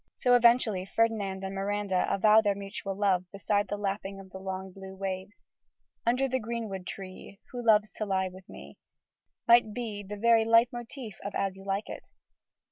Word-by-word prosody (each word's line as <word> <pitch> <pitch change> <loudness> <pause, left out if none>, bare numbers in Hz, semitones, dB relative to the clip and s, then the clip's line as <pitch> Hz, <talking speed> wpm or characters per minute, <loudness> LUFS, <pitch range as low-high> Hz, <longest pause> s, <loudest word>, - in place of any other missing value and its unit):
So, 250 - +2
eventually, 235 -5 +4
Ferdinand 200 -2 0
and 190 0 -4
Miranda 195 -1 -1
avow 215 +2 +5
their 205 -2 +1
mutual 195 0 -5
love 185 -3 +1
beside 205 +1 0
the 205 - -3
lapping 195 -1 -3
of 190 -1 -13
the 190 - -8
long 190 0 -5
blue 190 0 -10
waves. 190 +1 -5 0.6
"Under 250 +3 +3
the 260 0 0
greenwood 220 -5 -5
tree 195 +1 -9
Who 245 -1 -5
loves 215 -2 +4
to 215 - -2
lie 190 -1 +1
with 185 0 -14
me," - - -12 0.7
might 235 -3 +5
be 220 -4 -4
the 205 +1 -7
very 230 +1 +4
leit 230 +2 +4
motiv 240 -1 -7
of 200 - -5
As 195 -1 -1
You 195 0 -13
Like 195 +2 -2
It. - - -7
205 Hz, 180 wpm, -29 LUFS, 190-225 Hz, 0.7 s, avow